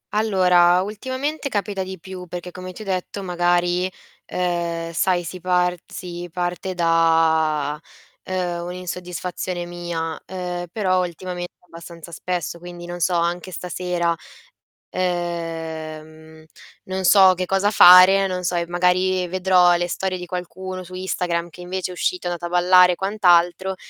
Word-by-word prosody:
Allora, 180 -4 +4
ultimamente 260 +8 -4
capita 205 -2 -2
di 190 0 -5
più, 185 0 -9
perché 180 +1 -7
come 185 0 -8
ti 215 +4 -9
ho - - -13
detto, 190 +1 -3
magari, 175 +1 +1 0.4
uhm, 170 -2 -2
sai 175 +1 +1
si 180 +2 -7
par 180 -1 +2 0.2
si 175 -1 -7
parte 180 +1 -3
da, 160 -3 +2 0.5
uhm, 180 -2 -2
un'insoddisfazione 180 0 -5
mia, 170 -2 -5
uhm, 180 -1 -4
però 185 -4 +1
ultimamente 175 +1 -6
abbastanza 170 0 -11
spesso. 170 0 -4
Quindi, 175 0 -9
non 175 0 -6
so, 180 +1 +1
anche 175 +2 -1
stasera, 175 -1 -2 0.7
uhm, 160 -3 -4 0.4
non 190 0 -4
so 190 -1 +7
che 185 0 -3
cosa 195 +2 +1
fare, 190 0 +8
non 180 -1 -3
so, 180 - 0
e 170 0 -1
magari 180 +1 +1
vedrò 180 -1 +4
le 175 0 -1
storie 185 +1 -2
di 180 - -7
qualcuno 185 +1 -6
su 185 +1 -13
Instagram 175 -2 -2
che 175 +2 -13
invece 185 +1 -4
è - - -7
uscito, 180 0 -2
è - - 0
andato 175 0 -4
a - - -9
ballare 180 0 +6
e - - -5
quant'altro, 185 -2 +2
180 Hz, 145 wpm, -22 LUFS, 175-185 Hz, 0.7 s, fare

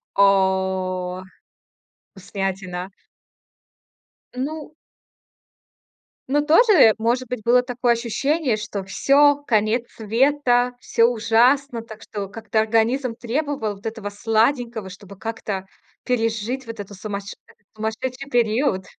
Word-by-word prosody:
О, 190 -2 +1 0.9
вкуснятина. 190 -1 -4 1.5
Ну. 305 +4 -5 1.5
Ну, 290 +2 +2
тоже, 325 - +6
может 240 +3 0
быть, 250 -1 -4
было 245 +1 +4
такое 245 -1 +1
ощущение, 255 +4 0
что 210 -2 -5
всё, 285 +8 +3
конец 220 +1 +2
света, 245 +2 +1
всё 230 - +2
ужасно. 240 +2 +2
Так 220 -1 -12
что 205 -2 -5
как-то 220 +1 -2
организм 230 +3 +1
требовал 250 -3 -2
вот 200 - -19
этого 220 -2 -4
сладенького, 225 0 0
чтобы 195 +1 -12
как-то 205 -4 -4 0.4
пережить 235 +1 -1
вот 230 -2 -8
это 205 0 -7
сумасше 200 0 -6 0.4
сумасшедший 250 +5 -4
период? 230 -3 +1
225 Hz, 100 wpm, -22 LUFS, 205-255 Hz, 1.5 s, тоже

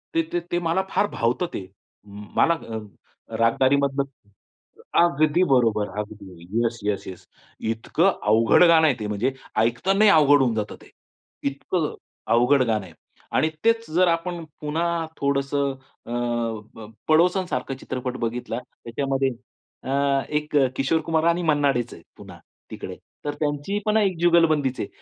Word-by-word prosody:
ते 165 - +4
ते 175 - +2
ते 175 - +1
मला 170 +2 +1
फार 205 - +1
भावतं 120 +10 0
ते. 95 - -5 0.4
म 105 0 -11
मला 170 - +5
अ, 115 -9 -6 0.6
रागदारीमधलं 135 +4 +2
अ 135 -6 -20 0.8
अगदी 155 +1 +3
बरोबर, 115 -5 +2
अगदी. 105 -3 -8 0.3
Yes, 120 0 -1
yes, 105 -1 -2
yes. 95 - -9 0.5
इतकं 160 +11 +1
अवघड 110 +7 +5
गाणं 165 -2 +6
आहे 135 - +2
ते. 105 - -3
म्हणजे 105 +6 -1 0.2
ऐकतानाही 190 - +3
अवघड 145 -3 +6
होऊन 120 -4 +1
जातं 105 -1 -3
ते. - - -17 0.6
इतकं 150 +3 -2
अ, - - -11 0.4
अवघड 125 +4 +4
गाणं 110 -5 -1
आहे 85 - -14 0.4
आणि 155 - +3
तेच 230 0 +2
जर 180 +2 +4
आपण 170 0 -1 0.2
पुन्हा 165 +2 -1
थोडंसं 140 0 0 0.3
अ, 120 - -9
अ, 115 -2 -3 0.2
पडोसन 180 +4 +3
सारखा 130 +1 -2
चित्रपट 125 0 -4
बघितला. 120 0 -3 0.2
त्याच्यामध्ये 135 +2 -1 0.5
अ, - - -6 0.4
एक 150 0 -2
अ, 135 -2 +4
किशोर 135 +5 +1
कुमार 160 -1 +1
आणि 170 +1 +1
मन्ना 145 -3 +3
डेच 120 -2 -3
आहेत 85 - -13
पुन्हा - - -12 0.3
तिकडे, - - -7 0.3
तर 145 - -1
त्यांची 145 +6 -1
पण 215 +1 +2
एक 195 -5 +1
जुगलबंदीच 155 -6 +3
आहे. - - -2
140 Hz, 155 wpm, -24 LUFS, 115-165 Hz, 0.8 s, गाणं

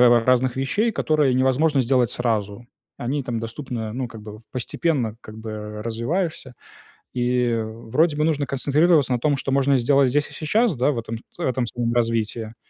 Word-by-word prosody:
р 120 -2 +6
разных 130 0 +2
вещей, 205 - 0
которые 150 -8 +2
невозможно 135 +3 +3
сделать 125 -1 +2
сразу. 110 -1 -2 0.3
Они 135 +4 -2
там 120 -2 -3
доступны, 115 +1 -5
э, 110 -1 -4
ну, 125 0 -3
как 110 -2 -11
бы 105 -1 -9
вот 110 - -14
постепенно, 125 -2 -1
как 110 0 -11
бы, 110 0 -7
э, 105 0 -6
развиваешься. 130 - -2 0.6
И, 125 -1 +1
вроде 115 +8 0
бы, 150 - +1
нужно 145 -3 +1
концентрироваться 145 +1 +2
на 120 - 0
том, 145 0 +2
что 135 0 -3
можно 140 0 +3
сделать 135 +1 +3
здесь 145 +2 +1
и - - -14
сейчас, 210 +5 +1
да, 130 +4 +2
в 120 - -3
этом 115 0 -5
с - - -24
в - - -11
этом 125 -3 0
своём 120 0 -2
развитии, 115 -1 -1
125 Hz, 195 wpm, -23 LUFS, 115-140 Hz, 0.6 s, р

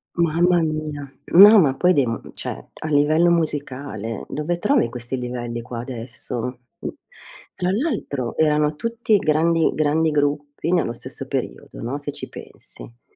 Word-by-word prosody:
Mamma 170 +1 +3
mia, 155 -3 -3 0.2
no 205 +5 +10
ma 140 -6 +4
poi 180 +6 +3
dei 140 -7 +3 0.3
cioè, - - -6
a 155 - -7
livello 155 +4 +4
musicale 140 -8 -2
dove 170 +3 -2
trovi 265 +6 +3
questi 125 +1 -5
livelli 120 -1 -4
qua 120 -1 -6
adesso? 125 0 -6 1.0
Tra 180 +1 0
l'altro 200 - -2
erano 150 -1 +2
tutti 230 +2 +1
grandi 165 0 +2
grandi 155 +1 +2
gruppi 145 +2 -1
nello 165 -10 +1
stesso - - -8
periodo, - - -5
no, 125 +5 -3
se 145 0 -5
ci - - -8
pensi. - - -12
150 Hz, 135 wpm, -22 LUFS, 125-170 Hz, 1.0 s, no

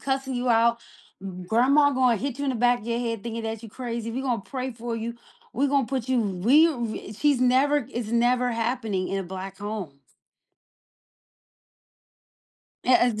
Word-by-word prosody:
cussing 265 -1 -2
you 245 0 -1
out. 235 0 +4 0.4
M 185 -2 -7
grandma 265 +9 +4
gonna 255 -3 +3
hit 265 +4 -4
you 285 - -2
in 275 - +1
the 255 - -2
back 245 +1 +3
of 215 - -12
your 235 0 -1
head 230 -3 -3
thinking 230 -1 -4
that 225 0 -4
you - - -8
crazy. 235 -1 -5
We 260 - -3
gonna 245 -6 -1
pray 260 +1 -4
for 230 0 -5
you. 230 +1 -4 0.4
We 280 +3 +1
gonna 275 -2 +2
put 260 -2 -3
you 255 -2 +2
we 220 - +4
w 235 -8 -4
she's 280 +3 +1
never 265 +2 +3
it's 235 -2 -3
never 245 +1 +2
happening 225 -5 -1
in 195 - -1
a 190 - -3
black 190 +1 -7
home. 205 -8 -5 3.0
E - - +7
a - - +4
z - - -4
235 Hz, 185 wpm, -25 LUFS, 220-260 Hz, 3.0 s, E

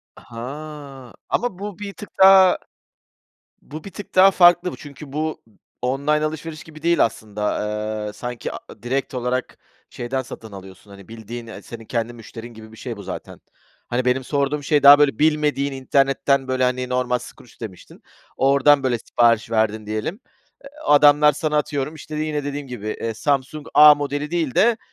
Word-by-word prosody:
Ha! 135 +1 -9 0.2
Ama 240 -7 -1
bu 205 -1 -7
bir 200 -1 -6
tık 205 - -10
daha, 190 -1 +7 1.0
bu 155 +2 -10
bir 200 - -9
tık 205 - -10
daha 190 +1 +7
farklı 175 0 +5
bu, - - -8
çünkü 145 -1 -11
bu, 155 +1 -3 0.4
online 140 +4 0
alışveriş 155 0 -6
gibi 155 -1 -14
değil 170 0 +3
aslında. 105 -2 -3 0.5
Eee, 105 - -6
sanki, 120 +2 -6
a - - -5
a - - -14
direkt 130 +3 -2
olarak 125 0 -3 0.3
şeyden 130 +2 -3
satın 115 -3 -10
alıyorsun, 95 +1 -12
hani, 100 -1 -13
bildiğin, 115 +1 -9
eee, 115 - -9
senin 115 -1 -10
kendi 115 +1 -3
müşterin 115 0 -11
gibi 110 0 -13
bir 110 - -14
şey 120 -2 -6
bu 100 - -9
zaten. - - -8 0.5
Hani, 125 +1 -1
benim 125 +1 +1
sorduğum 145 +2 -1
şey, 145 0 +1
daha, 140 +1 +10
böyle, 140 -6 +2
bilmediğin 150 -2 +1
internetten, 135 0 +1
böyle, 130 0 0
hani, 125 0 0
normal 125 -1 0
Skroutz 125 0 -15
demiştin. 105 -5 -10 0.3
Oradan 140 +1 +4
böyle 125 -2 +1
sipariş 115 0 +1
verdin 110 -1 0
diyelim, 110 - -4 0.4
eee, 275 - -11 0.2
adamlar 150 0 +6
sana, 150 +1 -1
atıyorum 150 0 -2
işte, 155 0 -9
yine 150 -1 -2
dediğim 145 0 -5
gibi, 120 -4 -7
eee, 115 - -2
Samsung 140 +4 -2
A 150 0 +9
modeli 145 +1 -4
değil 160 -7 -1
de 230 +2 +4
135 Hz, 170 wpm, -21 LUFS, 120-150 Hz, 1.0 s, daha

